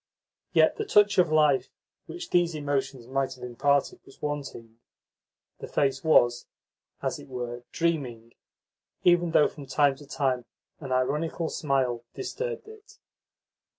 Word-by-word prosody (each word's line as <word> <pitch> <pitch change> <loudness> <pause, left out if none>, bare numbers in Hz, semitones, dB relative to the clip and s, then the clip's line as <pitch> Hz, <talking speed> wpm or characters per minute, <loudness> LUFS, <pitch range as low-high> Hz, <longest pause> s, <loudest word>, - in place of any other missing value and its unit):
Yet - - +4
the 435 - -2
touch 205 - +4
of 175 -3 +4
life 150 -3 +3 0.4
which 350 -1 -8
those 175 -2 +2
emotions 135 -4 -2
might 135 +1 -2
have 125 - -13
imparted 135 +3 +1
was 135 - -18
wanting. 135 -6 -5 0.8
The - - -7
face 135 +2 0
was, 120 -6 +4 0.6
as - - -2
it - - -12
were, 120 -2 -6
dreaming, 130 -9 -2 0.7
even 175 -1 +4
though 150 -2 +5
from 140 -2 -11
time 145 -1 +3
to 145 0 -14
time 130 -4 -1 0.3
an 135 -3 -7
ironical 150 +6 0
smile 130 -5 0
disturbed 465 +4 -4
it. 435 0 -15
140 Hz, 135 wpm, -27 LUFS, 130-165 Hz, 0.8 s, though